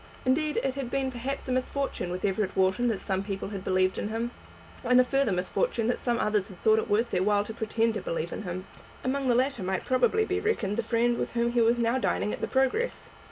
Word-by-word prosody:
Indeed 300 +4 +1
it 270 - 0
had 270 -3 -4
been 265 0 -1
perhaps 260 +3 -4
a - - -2
misfortune 255 -5 -1
with 180 +2 -3
Everett 195 0 0
Wharton 190 +6 +2
that 220 -5 0
some 190 -1 -1
people 195 -1 -4
had 195 -2 -6
believed 185 0 +1
in - - -2
him, 225 +2 -2 0.5
and 250 0 +5
a - - +7
further 270 -2 +1
misfortune 220 - 0
that 245 - 0
some 240 -1 0
others 210 -2 0
had 185 -3 -12
thought 220 0 +4
it - - -4
worth 225 +3 +2
their 180 - +1
while 205 +1 +3
to 220 - -7
pretend 225 0 0
to - - -3
believe 165 0 -3
in - - -5
him. 185 -1 -5 0.4
Among 270 +1 -1
the 245 - +4
latter 260 -2 +1
might 190 0 -2
probably 260 - +2
be 390 -1 -1
reckoned 230 - -1
the - - +2
friend 235 +1 +1
with - - -3
whom 235 0 +1
he 240 0 +2
was 230 +1 +4
now 235 +2 +1
dining 210 - 0
at - - -6
the - - -1
Progress. 270 - 0
235 Hz, 245 wpm, -28 LUFS, 200-260 Hz, 0.5 s, a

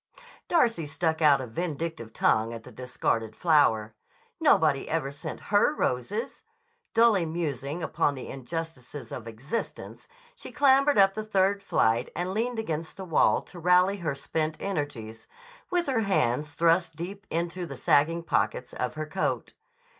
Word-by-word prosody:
Darcy 230 - +2
stuck 160 +1 -1
out 145 -3 +5
a - - -4
vindictive 160 -2 -4
tongue 110 +1 +1
at 115 - -9
the 125 - -12
discarded 115 -3 -2
flower. 115 -10 +3 0.5
Nobody 155 - +3
ever 155 -4 -1
sent 140 +1 -7
her 205 +9 +4
roses! 200 - -2 0.5
Dully 225 -5 +5
musing 155 -1 -3
upon 145 -1 0
the 130 - -7
injustices 135 -2 -6
of 115 -2 -7
existence, 130 - -6 0.3
she - - -10
clambered 275 0 +4
up 195 -1 +6
the 215 - -4
third 200 -1 +1
flight 115 - +1
and 180 +2 -2
leaned 235 +3 -1
against 165 -7 -4
the 190 - -6
wall 165 -4 +3
to 180 - -12
rally 180 +3 +4
her 165 -7 -2
spent 155 +3 -2
energies, 145 - -4 0.4
with 355 -1 +1
her 265 -5 +1
hands 150 - 0
thrust 170 0 +2
deep 195 +5 -7
into 170 +2 -2
the 140 -3 -8
sagging 165 +6 +2
pockets 125 - -1
of 125 +4 -3
her 155 0 -3
coat. 160 +5 -2
160 Hz, 150 wpm, -27 LUFS, 135-195 Hz, 0.5 s, up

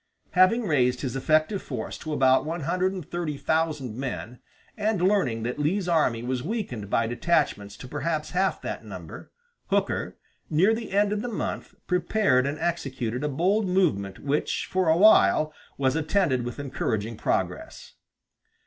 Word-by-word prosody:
Having 185 +6 +4
raised 125 - +1
his 130 -3 -3
effective 155 +7 +2
force 125 -6 -5
to 155 - -6
about 130 -3 +4
one 165 +2 -4
hundred 180 +5 0
and 185 -6 -7
thirty 170 -4 -3
thousand 155 -7 -1
men, 125 -2 -5 0.4
and 215 -2 0
learning 175 - +1
that 125 +5 -3
Lee's 180 +6 0
army 150 -9 +2
was 125 0 -2
weakened 140 - -4
by 115 - +2
detachments 115 -5 0
to - - -9
perhaps 155 +2 -2
half 190 +1 +1
that - - -5
number, - - -9 0.4
Hooker, - - -1 0.3
near 180 +8 +4
the 225 -2 -5
end 205 +1 +2
of 210 - -2
the 245 - -4
month, 220 - -4
prepared 180 -7 +2
and 145 +2 -3
executed 135 -8 -2
a 150 - 0
bold 190 +9 +1
movement 150 - +1
which 145 +2 -1
for 185 -3 +1
a 160 - +4
while 155 - +5 0.2
was 130 -1 +1
attended 155 -6 +1
with 120 - -5
encouraging 115 -5 -2
progress. - - -3
155 Hz, 160 wpm, -26 LUFS, 125-185 Hz, 0.4 s, while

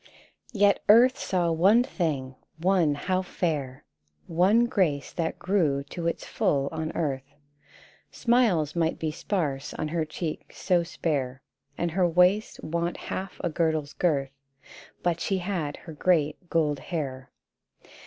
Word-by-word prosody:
Yet 205 -3 +3
earth 245 +5 +6
saw 175 -3 0
one 195 +9 +5
thing, 145 - -2 0.2
one 170 -3 +2
how 185 +5 0
fair! 150 -7 -3 0.4
One 195 +8 +3
grace 170 - 0
that 165 -2 -2
grew 165 -8 +1
to 170 -2 -3
its 170 - -2
full 140 -10 0
on 160 0 -3
earth: 140 -4 -3 0.7
Smiles 215 - +2
might 165 -1 +1
be 160 -1 -2
sparse 150 -5 -2
on 155 - -3
her 165 0 0
cheek 155 0 -5
so 180 -3 +2
spare, 140 -6 -3 0.3
And 170 -1 -1
her 180 +1 +2
waist 180 +5 +2
want 170 +2 -2
half 190 0 -6
a 175 - +1
girdle's 155 -3 0
girth, 140 -6 0 0.7
But 170 -1 +1
she 195 - 0
had 175 -6 -3
her 165 - -10
great 160 +1 +1
gold 150 -4 +1
hair. 135 -7 -5
165 Hz, 135 wpm, -27 LUFS, 150-185 Hz, 0.7 s, earth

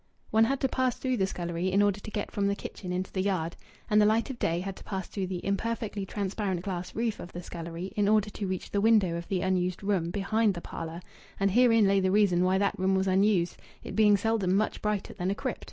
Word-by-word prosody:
One 220 +1 +5
had 270 +3 0
to 265 - +3
pass 255 -2 0
through 255 -2 -1
the 190 -2 +1
scullery 175 0 -2
in 200 +2 +4
order 205 0 +1
to 210 - -8
get 210 -1 -4
from 200 -1 0
the 200 - +1
kitchen 185 -2 -7
into 185 +1 -2
the 190 - -1
yard. 180 -4 -1 0.3
And 210 -1 +4
the - - +5
light 225 +4 +1
of 250 - -9
day 170 +1 0
had 195 0 -5
to - - -12
pass 190 -2 -4
through 195 -3 -4
the 180 -1 -5
imperfectly 205 0 -2
transparent 195 -3 -2
glass 180 -2 -5
roof 225 -1 -1
of 175 - -9
the 175 - -6
scullery 170 +2 -6
in 205 -1 +2
order 215 -1 +3
to 200 - -4
reach 185 -1 -4
the 200 - +1
window 210 -6 +4
of 170 0 -5
the 185 -2 -1
unused 185 0 0
room 190 -5 0
behind 205 +2 +1
the - - -4
parlour; 165 +1 -6 0.4
and 195 0 +2
herein 230 -1 +5
lay 195 0 +4
the 190 -1 +1
reason 190 -3 +3
why 185 +1 +3
that 200 -1 0
room 190 +1 +2
was 190 0 +1
unused, 190 -2 +2 0.3
it - - -7
being 210 -2 +5
seldom 200 -3 +1
much 215 +2 0
brighter 210 -2 -2
than 185 -1 -2
a 200 - 0
crypt. - - -3
195 Hz, 250 wpm, -28 LUFS, 185-210 Hz, 0.4 s, One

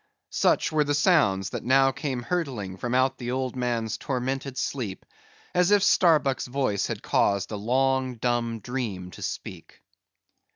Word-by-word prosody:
Such - - +2
were 155 -1 +3
the 145 0 0
sounds 140 - +3
that - - -5
now 135 +1 +4
came 135 -3 -4
hurtling 125 - -3
from 120 +5 -2
out 130 +1 +2
the 120 -1 -4
old 130 0 -2
man's 120 -3 -1
tormented 135 0 -3
sleep, 115 -10 -3 0.5
as 180 0 +3
if 205 -1 +4
Starbuck's 155 -10 +3
voice 125 -6 0
had - - -5
caused 100 0 +1
the 105 - -4
long 130 +3 +1
dumb 115 -1 -1
dream 105 -7 -4
to - - -12
speak. - - -7
130 Hz, 155 wpm, -26 LUFS, 115-135 Hz, 0.5 s, now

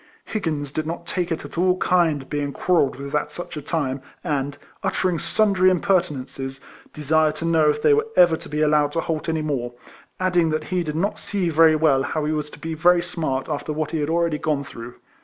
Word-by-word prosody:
Higgins 155 -9 -3
did 155 +1 -3
not 170 +1 -5
take 175 0 -2
it 165 - -3
at - - -6
all 180 0 +3
kind 165 -7 +1
being 145 -1 -2
quarrelled 165 -4 +2
with 140 +2 -8
at 150 0 0
such 175 +4 -7
a 150 - -5
time, 140 -3 -2 0.2
and, 145 -4 -2 0.2
uttering 180 -3 0
sundry 195 -3 +3
impertinences, 145 -8 -1 0.3
desired 155 +1 +1
to 165 - -5
know 160 -2 +4
if 185 +9 -1
they 440 - +6
were 440 +1 +2
ever 175 -2 +6
to - - -10
be 150 +1 -2
allowed 150 -1 +3
to 165 - 0
halt 160 0 -3
any 160 -1 -1
more, 125 -5 -2 0.5
adding 180 -3 +2
that 155 0 -1
he 180 - +2
did 155 -3 -4
not 205 +6 -1
see 195 -4 -1
very 160 0 +5
well 150 -4 +3
how 150 +2 -2
he 155 - 0
was 150 -1 -2
to - - -12
be 165 0 -4
very 175 +2 +4
smart 155 -7 -2
after 150 0 -3
what 150 -1 -2
he 160 - -1
had 145 0 -1
alread}^ 165 -2 0
gone 150 -3 0
through. 120 -2 -9
155 Hz, 215 wpm, -23 LUFS, 145-175 Hz, 0.5 s, they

